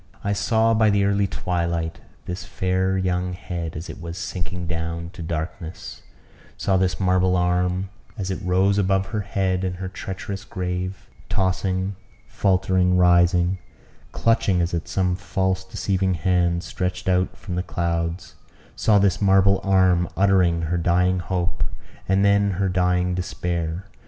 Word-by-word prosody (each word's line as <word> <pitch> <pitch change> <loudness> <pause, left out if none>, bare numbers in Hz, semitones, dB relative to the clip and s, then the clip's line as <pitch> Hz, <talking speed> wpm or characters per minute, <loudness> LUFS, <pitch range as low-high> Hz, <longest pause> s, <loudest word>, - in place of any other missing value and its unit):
I 100 - 0
saw 110 +2 +2
by 110 -1 +4
the 100 -1 +3
early 100 0 +2
twilight 85 -3 -2 0.3
this 90 -1 -5
fair 95 +2 0
young 90 -1 -1
head, 85 -2 -5
as 80 +4 -6
it 100 - -9
was 85 0 -6
sinking 90 0 -4
down 85 0 -4
to 95 - -10
darkness 80 +1 -5 0.6
saw 95 - +1
this 95 -1 +1
marble 95 -1 +3
arm, 90 +1 0 0.3
as 95 -2 -3
it 95 - -3
rose 95 +2 +2
above 95 0 +2
her 105 0 -2
head 95 -2 -1
and 90 -1 -2
her 95 +1 -5
treacherous 95 +1 -6
grave, 90 0 -4 0.2
tossing, 95 0 0 0.3
faultering, 95 -2 +2
rising, 90 +1 +4 0.5
clutching 115 -5 +2
as 85 0 0
at 85 0 -2
some 90 +1 0
false 95 +1 -1
deceiving 95 -1 -1
hand 85 0 +1
stretched 90 -1 -3
out 90 0 +1
from 100 -5 -7
the 90 - 0
clouds 85 0 -2 0.4
saw 105 -2 +3
this 100 -1 +2
marble 95 0 +4
arm 95 -3 +3
uttering 90 -4 +3
her 85 +2 0
dying 90 +2 +2
hope, 90 0 -2 0.5
and 95 +1 +3
then 100 0 +4
her 100 -1 +1
dying 90 0 +1
despair. 90 -1 -3
90 Hz, 145 wpm, -23 LUFS, 90-95 Hz, 0.6 s, by